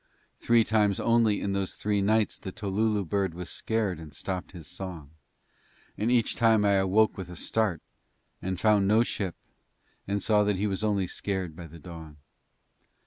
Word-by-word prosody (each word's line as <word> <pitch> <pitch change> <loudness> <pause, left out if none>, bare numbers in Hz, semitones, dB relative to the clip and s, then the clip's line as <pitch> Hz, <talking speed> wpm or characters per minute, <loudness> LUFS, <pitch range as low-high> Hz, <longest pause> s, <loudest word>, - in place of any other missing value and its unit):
Three 115 -1 +4
times 105 -2 +2
only 115 -3 +3
in 100 - -1
those 100 -1 -2
three 105 -1 0
nights 110 +2 +1
the 95 - -6
tolulu 105 +1 -1
bird 95 -1 -1
was 90 0 -6
scared 105 -6 -1
and 75 -3 -11
stopped 95 +3 -4
his 85 -5 -10
song, 90 -5 -8 0.8
and 110 - -1
each 120 -3 +2
time 110 -2 +4
I 100 - +4
awoke 100 +2 +3
with 95 -2 -6
a 90 - -8
start 100 -1 0 0.6
and 95 -1 -3
found 105 -2 +3
no 110 +3 +5
ship 95 -6 -3 0.7
and 100 0 -1
saw 105 -1 +3
that 105 -1 +1
he 100 +3 -1
was 100 0 -2
only 100 -3 +1
scared 95 -2 -3
by 85 -1 -9
the 80 +2 -12
dawn. 80 -2 -10
100 Hz, 175 wpm, -28 LUFS, 90-110 Hz, 0.8 s, no